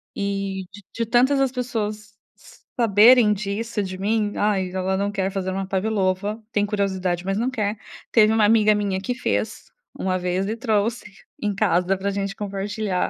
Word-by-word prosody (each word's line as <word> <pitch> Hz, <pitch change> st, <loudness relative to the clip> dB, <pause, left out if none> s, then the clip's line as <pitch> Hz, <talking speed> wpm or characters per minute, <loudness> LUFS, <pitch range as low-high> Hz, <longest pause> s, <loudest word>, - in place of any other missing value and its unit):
E 195 Hz, -1 st, -3 dB
d 205 Hz, +2 st, -12 dB
de 230 Hz, -, -2 dB
tantas 255 Hz, +4 st, +3 dB
as 265 Hz, -2 st, +2 dB
pessoas 215 Hz, -4 st, -4 dB, 0.2 s
s -, -, -19 dB, 0.2 s
saberem 225 Hz, +1 st, +6 dB
disso 210 Hz, +2 st, -3 dB
de 185 Hz, -1 st, -5 dB
mim, 210 Hz, +1 st, 0 dB
"Ai, 195 Hz, -3 st, +1 dB
ela 190 Hz, 0 st, -1 dB
não 200 Hz, +1 st, -1 dB
quer 195 Hz, -1 st, -1 dB
fazer 190 Hz, -1 st, -2 dB
uma 195 Hz, 0 st, -3 dB
pavlova, 195 Hz, +1 st, -1 dB
tem 205 Hz, -, +1 dB
curiosidade, 190 Hz, -4 st, -1 dB
mas 195 Hz, +1 st, -1 dB
não 240 Hz, +3 st, 0 dB
quer", 215 Hz, -4 st, -2 dB, 0.3 s
teve 220 Hz, -1 st, +5 dB
uma 220 Hz, -2 st, +4 dB
amiga 215 Hz, -1 st, +4 dB
minha 200 Hz, -2 st, -1 dB
que 250 Hz, +3 st, -2 dB
fez 255 Hz, -, -3 dB, 0.3 s
1 185 Hz, -1 st, -1 dB
vez 180 Hz, +2 st, -1 dB
e 220 Hz, -, -2 dB
trouxe 225 Hz, -1 st, 0 dB, 0.4 s
em 210 Hz, -2 st, -1 dB
casa 190 Hz, -2 st, +2 dB
pra 200 Hz, +1 st, -2 dB
gente 195 Hz, 0 st, -3 dB
compartilhar. 200 Hz, -1 st, -2 dB
205 Hz, 175 wpm, -23 LUFS, 190-220 Hz, 0.4 s, saberem